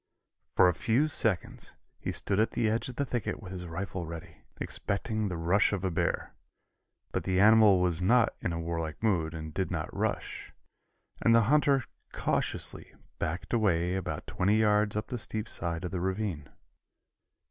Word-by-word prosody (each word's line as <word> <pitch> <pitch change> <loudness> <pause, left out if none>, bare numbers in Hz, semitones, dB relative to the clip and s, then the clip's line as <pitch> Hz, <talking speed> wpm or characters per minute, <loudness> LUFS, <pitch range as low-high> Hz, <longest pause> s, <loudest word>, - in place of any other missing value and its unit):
For 90 - +7
a 90 - +3
few 115 - +2
seconds 110 - -1 0.2
he - - -3
stood 100 - -1
at 110 - +3
the 115 - +1
edge 115 +3 -1
of 125 - -7
the 140 - -1
thicket 120 -4 -3
with 95 -4 -9
his 90 -1 -6
rifle 90 +1 -4
ready, 85 0 -8 0.2
expecting 110 +1 -2
the 90 -3 -3
rush 85 +5 +3
of 100 -2 -2
the 95 - 0
bear, - - -1 0.8
but - - -2
the 95 -1 +1
animal 105 -2 +7
was 90 -2 +2
not 115 +5 +4
in 90 - -1
a 85 - -3
warlike 80 0 -4
mood 85 -7 +1
and 80 -1 -6
did 95 +2 -1
not 80 -3 -4
rush, - - -3 0.7
and 115 - +5
the 115 - +6
hunter 140 +2 +3 0.3
cautiously - - -1 0.2
backed 85 +8 -3
away 90 -6 +2
about 95 -1 -3
twenty 100 +4 +1
yards 105 -1 +3
up 105 - -1
the 125 -3 -4
steep 110 0 -3
side 85 0 -3
of 90 - -4
the 95 - -2
ravine. 95 -3 -2
95 Hz, 175 wpm, -30 LUFS, 85-110 Hz, 0.8 s, For